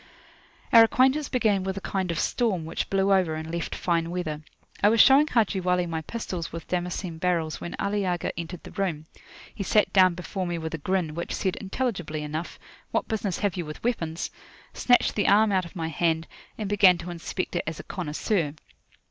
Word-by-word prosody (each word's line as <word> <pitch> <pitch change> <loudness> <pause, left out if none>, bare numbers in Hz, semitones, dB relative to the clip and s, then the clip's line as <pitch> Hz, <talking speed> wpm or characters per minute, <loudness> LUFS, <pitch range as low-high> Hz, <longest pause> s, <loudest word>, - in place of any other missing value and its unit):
Our 230 - +10
acquaintance 265 +4 +3
began 215 -7 +2
with 190 0 -3
a - - -4
kind 190 -2 -2
of 170 - -1
storm, 205 -10 0
which 165 - -3
blew 195 0 +3
over, 180 -5 +2
and 160 +1 -5
left 170 - -3
fine 170 -2 0
weather. 165 -4 -3 0.4
I 205 - +6
was 225 +1 +2
showing 275 +5 +7
Haji 220 -8 +1
Wali 180 -1 +1
my 165 -2 -3
pistols 180 -2 -5
with 165 0 -7
Damascene 180 -1 -3
barrels 170 -3 -1
when 170 - -5
Ali 205 0 -1
Agha 180 -2 -1
entered 170 +1 -6
the - - -10
room. 170 -6 -2 0.5
He - - -7
sat 210 +2 +2
down 185 -2 +5
before 180 +1 -4
me 175 -1 -2
with 160 0 -5
a 165 - -3
grin, 180 -1 -1
which 170 +2 -4
said 190 -2 -1
intelligibly 190 -8 -3
enough, 155 +3 -5 0.3
"What - - -1
business 210 -5 -1
have 200 -4 0
you 180 - -2
with 155 -1 -9
weapons?" 170 -9 -2 0.4
snatched 245 -1 +3
the 205 - +1
arm 210 +1 +5
out 185 -2 +1
of 170 - -12
my 165 -2 -3
hand, 160 0 0 0.3
and 215 - -3
began 195 -3 +5
to 175 +1 -7
inspect 175 +2 -4
it 175 - 0
as 160 -1 -4
a - - -7
connoisseur. 165 -1 -2
180 Hz, 200 wpm, -26 LUFS, 165-200 Hz, 0.5 s, Our